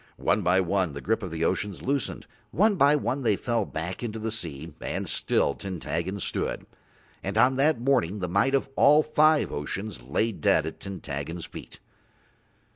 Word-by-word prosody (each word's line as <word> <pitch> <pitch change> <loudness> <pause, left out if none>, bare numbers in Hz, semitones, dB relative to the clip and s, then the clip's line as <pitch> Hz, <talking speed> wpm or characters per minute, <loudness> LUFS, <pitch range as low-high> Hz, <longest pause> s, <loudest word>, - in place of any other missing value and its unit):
One 105 - +1
by 90 0 +3
one 95 -3 0
the 70 - -6
grip 110 +2 0
of 95 - -4
the 80 0 -2
oceans 95 +2 -2
loosened, 140 0 -2 0.2
one 210 +4 +3
by 145 -3 +5
one 135 -1 -1
they 110 -5 +2
fell 115 0 -1
back 80 +3 -5
into 115 -2 -4
the 110 0 -3
deep 80 -1 -8
and - - -3
still - - +1
Tintaggon 95 +1 -4
stood, - - -2 0.6
and 95 +3 -2
on 125 +4 +5
that 145 -1 +3
morning 120 -7 +1
the 90 -3 -3
might 100 +10 +2
of 135 - 0
all 150 +2 +6
five 155 0 +3
oceans 95 - -4
lay 70 - 0
dead 95 - +2
at 80 - -6
Tintaggon's 80 -3 -5
feet. - - -11
100 Hz, 175 wpm, -27 LUFS, 85-125 Hz, 0.6 s, all